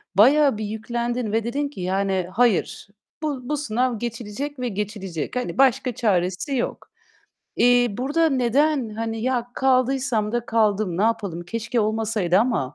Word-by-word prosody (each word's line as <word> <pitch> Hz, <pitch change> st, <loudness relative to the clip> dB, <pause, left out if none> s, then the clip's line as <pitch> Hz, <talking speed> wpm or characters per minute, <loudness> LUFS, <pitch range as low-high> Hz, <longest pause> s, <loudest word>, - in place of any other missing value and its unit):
bayağı 270 Hz, +4 st, +5 dB
bir 215 Hz, -, -3 dB
yüklendin 235 Hz, +2 st, -3 dB
ve 225 Hz, +1 st, +1 dB
dedin 280 Hz, +6 st, -2 dB
ki: 280 Hz, -, -9 dB
"Yani, 190 Hz, 0 st, 0 dB
hayır, 230 Hz, -4 st, +1 dB, 0.4 s
bu 295 Hz, -4 st, -1 dB
bu 300 Hz, -, 0 dB
sınav 245 Hz, -3 st, -1 dB
geçilecek 240 Hz, +4 st, -5 dB
ve 250 Hz, -, -1 dB
geçilecek. 195 Hz, -4 st, -4 dB
Hani, 250 Hz, -, -3 dB
başka 260 Hz, -1 st, +3 dB
çaresi 195 Hz, +3 st, 0 dB
yok." 245 Hz, -, -3 dB, 0.7 s
Eee, 245 Hz, 0 st, +5 dB
burada 280 Hz, +10 st, +1 dB
neden, 270 Hz, 0 st, +2 dB
hani, 225 Hz, +1 st, -4 dB
"Ya 250 Hz, -1 st, 0 dB
kaldıysam 255 Hz, -4 st, +1 dB
da 240 Hz, 0 st, -2 dB
kaldım, 215 Hz, -5 st, +1 dB
ne -, -, +2 dB
yapalım, 205 Hz, -7 st, -1 dB
keşke 230 Hz, +5 st, -2 dB
olmasaydı 215 Hz, -4 st, +1 dB
ama, 220 Hz, -, 0 dB
230 Hz, 145 wpm, -23 LUFS, 210-255 Hz, 0.7 s, bayağı